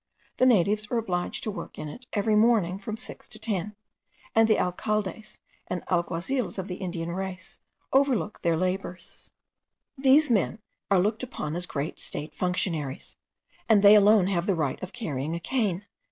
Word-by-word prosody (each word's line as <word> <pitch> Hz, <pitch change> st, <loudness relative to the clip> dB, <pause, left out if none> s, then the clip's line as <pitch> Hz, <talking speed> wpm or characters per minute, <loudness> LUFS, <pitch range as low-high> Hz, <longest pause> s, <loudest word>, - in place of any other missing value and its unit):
The 255 Hz, -, +5 dB
natives 210 Hz, -1 st, +3 dB
are 240 Hz, -, 0 dB
obliged 185 Hz, -6 st, -2 dB
to 215 Hz, -, -1 dB
work 205 Hz, -, -8 dB
in 150 Hz, -, -5 dB
it 245 Hz, -, -10 dB
every 210 Hz, +1 st, +2 dB
morning 210 Hz, -5 st, +3 dB
from 215 Hz, +2 st, -5 dB
six -, -, -7 dB
to -, -, -9 dB
ten, 210 Hz, -1 st, -2 dB, 0.6 s
and 225 Hz, 0 st, +5 dB
the 215 Hz, -, +5 dB
alcaldes 215 Hz, +3 st, -2 dB, 0.3 s
and 180 Hz, -, -3 dB
alguazils 180 Hz, +8 st, -1 dB
of 190 Hz, 0 st, -4 dB
Indian 175 Hz, -2 st, -4 dB
race 185 Hz, 0 st, -5 dB, 0.3 s
overlook 265 Hz, -6 st, +2 dB
their 170 Hz, -1 st, +2 dB
labours. 185 Hz, 0 st, -3 dB, 0.7 s
These 275 Hz, +1 st, +5 dB
men 215 Hz, -1 st, +2 dB, 0.3 s
are 200 Hz, -, +5 dB
looked 205 Hz, +5 st, +1 dB
upon 165 Hz, -11 st, -4 dB
as 180 Hz, +1 st, -3 dB
great 145 Hz, +2 st, -4 dB
state 150 Hz, -, -4 dB
functionaries, 175 Hz, -6 st, -2 dB, 0.5 s
and 210 Hz, -2 st, +5 dB
they 205 Hz, +1 st, +10 dB
alone 210 Hz, -1 st, +6 dB
have 180 Hz, -2 st, 0 dB
the 195 Hz, -, +2 dB
right 150 Hz, -5 st, -1 dB
of 185 Hz, 0 st, -6 dB
carrying 155 Hz, -, -3 dB
a -, -, -3 dB
cane. 205 Hz, -4 st, -1 dB
195 Hz, 165 wpm, -27 LUFS, 175-220 Hz, 0.7 s, they